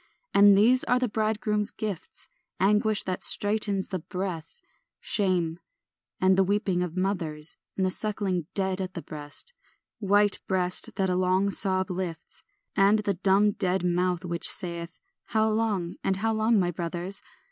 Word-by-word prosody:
And 200 0 +6
these 245 +5 +4
are 250 - +2
the 250 0 0
bridegroom's 215 -1 -1
gifts; 205 -6 -6 0.3
Anguish 210 +2 +2
that 185 -1 -4
straitens 205 -2 +1
the 185 - -3
breath, 180 - -6 0.4
Shame, 175 -5 +1 0.6
and 190 0 +4
the 195 - +4
weeping 190 -2 0
of 180 0 -4
mothers, 165 -5 -1 0.2
And 190 - +1
the 185 - +1
suckling 195 -6 0
dead 190 -1 0
at 185 0 -6
the 170 - -6
breast, 150 - -3 0.5
White 205 0 +2
breast 185 +4 +2
that 190 -2 0
a - - 0
long 185 +2 +1
sob 190 0 +1
lifts; 175 -3 -6 0.3
And 200 +1 +4
the 205 -1 -1
dumb 195 +3 +2
dead 190 -2 -1
mouth, 180 0 0
which 170 -1 +1
saith, 170 -2 -2 0.3
"How 220 -1 +1
long, 215 -6 -1
and 195 - +1
how 220 +3 -1
long, 220 +1 +2
my 175 -2 0
brothers?" 175 +3 -1
190 Hz, 155 wpm, -26 LUFS, 180-210 Hz, 0.6 s, And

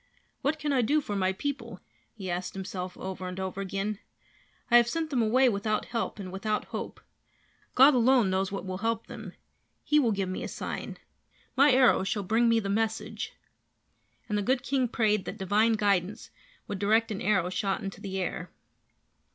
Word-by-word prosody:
"What 295 +3 0
can 300 -2 -1
I 260 - +3
do 290 +7 +3
for 210 -8 -4
my 190 -1 +1
people?" 235 -2 -4 0.4
he 195 -4 -7
asked 180 +2 -3
himself 185 -1 -5
over 185 -1 -5
and 180 +1 -6
over 190 +1 -3
again. 195 +2 -3 0.7
"I 240 - +9
have 240 -1 +5
sent 320 +4 -2
them 255 -4 +2
away 250 +4 +4
without 215 -1 0
help 230 -2 -3
and 190 -3 -7
without 210 +3 -2
hope. - - -5 0.8
God 270 +3 +8
alone 245 -4 +4
knows 190 0 0
what 195 -2 -4
will 185 0 -4
help 225 +1 -1
them. - - -9 0.5
He 300 - +3
will 240 -6 +2
give 195 -2 -1
me 185 - -4
a - - -3
sign. - - -5 0.6
My 280 +2 +6
arrow 255 -5 +5
shall 205 +1 -1
bring 225 +5 +3
me 230 0 +4
the 200 - -4
message." 220 +2 -2 0.9
And 210 -2 0
the - - 0
good 255 +4 +1
king 265 -2 +1
prayed 215 -4 +1
that - - -6
divine 210 +3 +2
guidance 200 -2 0 0.4
would 200 - -4
direct 220 +3 +2
an 200 - -4
arrow 185 -3 +1
shot 195 +1 -1
into 195 0 -6
the 195 -2 -4
air. 180 -1 -3
210 Hz, 185 wpm, -28 LUFS, 190-240 Hz, 0.9 s, I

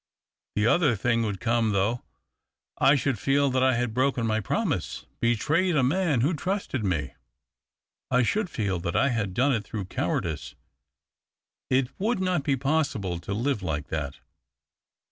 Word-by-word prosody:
The 105 - +2
other 145 0 +4
thing 115 +3 +1
would 105 -4 -2
come 115 0 +1
thouojh 105 +5 +1 0.4
— - - -63
I 145 - +7
should 135 -4 0
feel 140 +5 +2
that 130 0 +1
I 130 -1 +4
had 120 -1 -1
broken 130 -1 +1
my 110 -1 +1
promise, 105 - -2
betrayed 155 - +2
a 135 - +3
man 150 -2 +2
who 150 +8 +2
trusted 175 - -2
me. 80 -9 -1 1.0
I 125 0 +3
should 205 - 0
feel 100 - -1
that 85 0 -3
I 140 - +3
had 105 -7 -2
done 135 +3 +3
it 110 -3 -1
through 105 -4 -5
cowardice. 90 - -3 1.1
It 130 -1 +2
would 220 +2 0
not 185 -4 +1
be 140 0 +1
possible 135 - 0
to 90 +4 -5
live 120 0 0
like 75 -5 -3
that. 70 -3 -3
120 Hz, 165 wpm, -26 LUFS, 100-140 Hz, 1.1 s, I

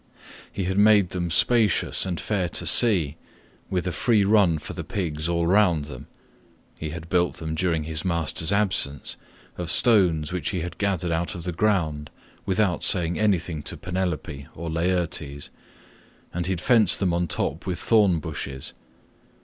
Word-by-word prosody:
He 100 - -3
had 95 +2 0
made 105 -3 +5
them 85 -2 -2
spacious126 110 +3 +2
and 90 -3 -3
fair 95 -5 -1
to - - -1
see, 85 -11 +4 0.5
with 90 -1 -1
a 90 - -1
free 105 +5 +2
run 100 -6 +4
for - - -8
the - - -5
pigs 80 -4 -3
all 85 -1 0
round 90 -5 +3
them; 75 - -10 0.7
he 80 - -5
had 80 +1 -7
built 90 0 +1
them 80 -1 -5
during 80 -1 0
his 80 0 -4
master's 80 -3 0
absence, 100 -9 0 0.4
of 85 -2 -3
stones 90 -7 +3
which 90 -4 -1
he 90 -4 -2
had 85 0 -6
gathered 95 -4 0
out 85 +1 -1
of 85 - -7
the 90 - -3
ground, 80 -6 0 0.4
without 95 -2 +1
saying 85 -2 +2
anything 90 -7 0
to - - -5
Penelope 90 -7 -4
or 85 0 -5
Laertes, 80 -4 -2 0.8
and 85 0 -2
he - - -1
had 90 - -5
fenced 110 -5 +4
them 90 -3 +1
on 85 0 0
top 80 +3 -2
with 90 -2 -2
thorn 105 -6 +3
bushes. 70 -3 -5
90 Hz, 165 wpm, -24 LUFS, 80-95 Hz, 0.8 s, made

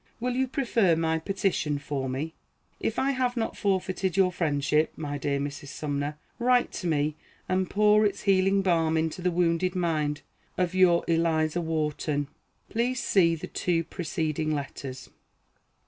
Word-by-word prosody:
Will 250 +1 -1
you 260 +1 +1
prefer 235 - +2
my 160 0 0
petition 175 -4 -1
for 140 -2 -3
me? 145 +5 -3 0.5
If 225 - -2
I 275 +1 +2
have 250 -2 -1
not 225 - -1
forfeited 190 -2 -1
your 190 -2 +4
friendship, 150 -2 +1
my 145 -2 -4
dear 140 0 0
Mrs. 145 0 -5
Sumner, 145 +1 -3 0.2
write 245 0 +3
to 180 - -4
me, 150 -1 0 0.3
and 185 0 0
pour 210 +1 +4
its 205 -2 0
healing 195 0 +3
balm 165 -3 +2
into 160 +2 -1
the 180 - +2
wounded 175 +1 +1
mind 155 -4 0 0.3
of 180 -1 0
your 180 -2 +4
ELIZA 165 0 +1
WHARTON. 150 -3 -1 0.4
[Footnote 230 +1 0
A: 250 +1 0
See 185 -8 +3
the 160 - -6
two 170 -2 0
preceding 160 -2 -2
letters. 135 -2 -6
165 Hz, 155 wpm, -27 LUFS, 150-195 Hz, 0.5 s, your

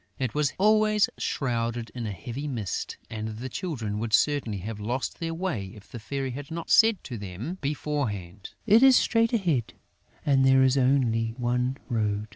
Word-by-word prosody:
It 130 -4 -2
was 150 -2 +1
always 215 +1 +4
shrouded 115 -3 -2
in 120 -3 -4
a - - -3
heavy 120 - -6
mist; 115 -9 -3
and 110 0 -5
the 130 +3 -5
Children 115 - -3
would 110 -1 -3
certainly 135 -5 +2
have 105 +2 -6
lost 120 +5 -3
their 165 -1 -3
way, 170 - -2
if 105 -1 -16
the 120 - -7
Fairy 135 +3 -3
had 140 +3 -7
not 165 0 -5
said 225 -2 +5
to 120 -4 -6
them 105 - -6
beforehand: 115 - -3
"It 225 +1 +6
is 265 -1 +8
straight 230 -1 +2
ahead; 170 - 0 0.5
and 135 -2 +4
there 135 0 +5
is 130 0 +4
only 120 -4 +2
one 125 +1 0
road." 105 -3 -1
130 Hz, 175 wpm, -27 LUFS, 110-150 Hz, 0.5 s, is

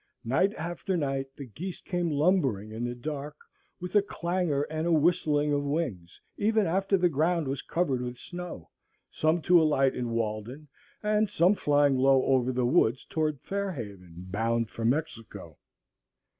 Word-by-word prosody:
Night 155 +12 +2
after 175 +3 -3
night 135 -3 -1
the 140 - -8
geese 170 - -7
came 175 -2 -2
lumbering 145 - +1
in 110 - -7
in 120 - -2
the 120 0 -3
dark 145 +3 -5 0.4
with 180 0 -6
a 205 - +7
clangor 175 -6 -1
and 155 +2 -3
a - - +2
whistling 150 -2 +2
of 145 - +1
wings, 140 - -3 0.2
even 220 0 +2
after 195 +3 +1
the 180 -1 +3
ground 165 0 +1
was 135 0 -2
covered 150 -7 -1
with 125 0 -5
snow, 175 - -8 0.4
some 155 +1 +1
to 175 -1 +6
alight 135 -4 +3
in 120 -1 -3
Walden, 115 +5 -3 0.4
and 210 0 +2
some 180 0 +4
flying 145 -6 +3
low 135 0 +4
over 130 -1 +2
the 125 -1 0
woods 120 0 +2
toward 155 -6 -1
Fair 200 -1 -3
Haven, 100 - -9
bound 115 +3 -1
for 115 - -6
Mexico. 120 - -3
145 Hz, 165 wpm, -28 LUFS, 125-175 Hz, 0.4 s, a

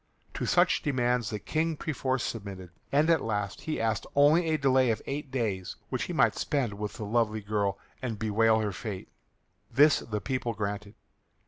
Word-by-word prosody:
To - - -3
such - - +3
demands 125 -5 +1
the 105 - -3
King 160 +9 -1
perforce 135 -5 -1
submitted, 95 -5 -6 0.2
and 145 +3 +3
at 165 - +3
last 105 -3 -2
he 155 - -3
asked 110 -2 -1
only 150 +4 +5
a 155 - +2
delay 130 -3 +3
of 110 -2 +1
eight 140 0 -4
days 110 -8 -2
which - - -2
he - - -5
might - - +3
spend 130 -8 -1
with 105 +1 -5
the 105 - -6
lovely 110 0 +1
girl 100 -1 -1 0.2
and 115 -4 -3
bewail 110 +1 +3
her 105 -1 -1
fate. 95 0 -6 0.6
This 145 +5 +5
the 105 -2 -4
people 125 -2 -2
granted. 100 0 -4
115 Hz, 180 wpm, -29 LUFS, 105-135 Hz, 0.6 s, only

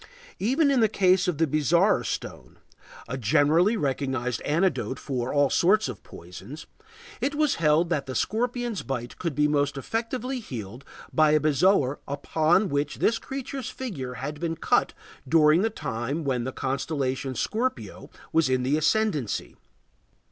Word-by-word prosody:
Even 275 +8 +2
in 270 - +3
the 220 -2 +4
case 185 -2 +3
of 175 -5 0
the 165 - +3
bezoar 155 - +2
stone, - - -6 0.5
a 130 +3 -4
generally 155 - +3
recognized 130 - -2
antidote 155 -4 0
for 125 -3 -3
all 145 -2 +2
sorts 205 +3 +3
of 120 -7 -7
poisons, 95 - -11 0.6
it 285 +1 -1
was 300 -2 +1
held 160 +2 +3
that 145 -5 -1
the 130 - -5
scorpion's 240 - -1
bite 125 -3 -5
could 170 -6 -3
be 150 +1 +3
most 145 -1 0
effectually 240 - -3
healed 120 - -8 0.3
by 155 -1 +4
a 155 0 +4
bezoar 150 -1 +2
upon 160 +7 +1
which 145 -2 -1
this 225 - +1
creature's 270 -1 -5
figure 140 - -6
had 145 +3 -5
been 165 0 -2
cut - - +1 0.3
during 155 +2 +5
the 225 - +1
time 140 - -4
when 125 -4 -1
the 130 - -3
constellation 135 -1 -2
Scorpio 250 - -3 0.2
was 160 -4 +3
in 130 -1 +1
the 140 +4 +1
ascendancy. 155 - 0
150 Hz, 150 wpm, -26 LUFS, 135-200 Hz, 0.6 s, during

